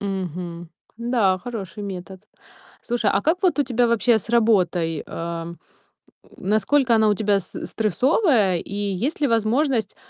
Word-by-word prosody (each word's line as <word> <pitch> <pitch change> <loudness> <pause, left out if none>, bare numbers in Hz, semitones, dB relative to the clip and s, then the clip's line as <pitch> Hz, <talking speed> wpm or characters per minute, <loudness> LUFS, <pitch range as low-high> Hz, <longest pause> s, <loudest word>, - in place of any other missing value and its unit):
Мгм, 180 -3 -5 0.3
да, 230 -6 +1
хороший 210 -4 -7
метод. 190 -1 -7 0.6
Слушай, 235 -4 0
а 195 - +2
как 345 +5 +1
вот 360 -5 +2
у 290 - +5
тебя 245 -1 +1
вообще 235 0 +3
с 220 - -7
работой, 180 -9 +2
а, 170 0 -5
м, 170 +1 -9 0.8
насколько 235 +6 +2
она 220 -1 +4
у 210 - +3
тебя 205 -1 +1
с - - -11
э, - - -5
стрессовая 225 - +2
и 200 - -8
есть 205 - -2
ли 290 - +3
возможность 230 0 +1
210 Hz, 155 wpm, -22 LUFS, 185-240 Hz, 0.8 s, у